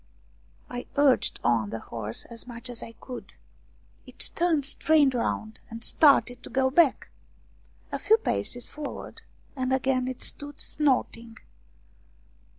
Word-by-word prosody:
I 245 0 -6
urged 285 -3 +3
on 115 -3 +2
the 115 - -4
horse 110 -1 -5
as 235 +1 -8
much 240 +1 -8
as 235 - -7
I 230 - -8
could. 250 +2 -9 0.7
It - - -3
turned 330 -5 +2
straight 290 -1 +3
round 220 -2 -2
and 230 +1 -8
started 265 -5 +4
to - - -10
go 260 0 +1
back. 310 -1 +3 0.8
A - - -2
few 435 +2 +5
paces 245 - -2
forward, 295 -1 -7 0.3
and 260 -1 -1
again 260 -1 +1
it 260 -1 -4
stood 290 0 -3
snorting. 235 -5 -1
255 Hz, 135 wpm, -27 LUFS, 230-285 Hz, 0.8 s, few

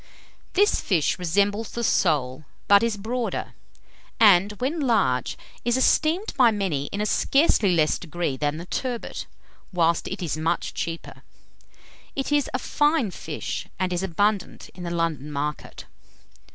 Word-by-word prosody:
This 410 +3 +3
fish 170 -3 +1
resembles 200 +5 +1
the 235 - -4
sole, 150 - +1 0.2
but 200 0 +7
is 230 -2 0
broader, 230 +3 -3 0.7
and 205 -2 +6
when 265 - -2
large, 200 - +1 0.3
is 240 +1 +1
esteemed 325 +9 +2
by 255 -4 +6
many 190 -10 -1
in 205 - -4
a - - 0
scarcely 215 - +3
less 155 -2 +2
degree 170 -4 -3
than 145 +2 -1
the 170 - -7
turbot, 245 +4 -4 0.4
whilst 170 -2 +1
it 190 0 -5
is 160 - -1
much 165 +2 -1
cheaper. 165 0 -5 0.9
It 270 +1 -2
is 290 -1 +2
a - - 0
fine 295 - +1
fish, 160 -3 -5
and 185 -1 -1
is 175 - -1
abundant 195 +2 -1
in 180 - -11
the - - -3
London 165 -4 -2
market. 145 +1 -4
190 Hz, 145 wpm, -24 LUFS, 165-235 Hz, 0.9 s, but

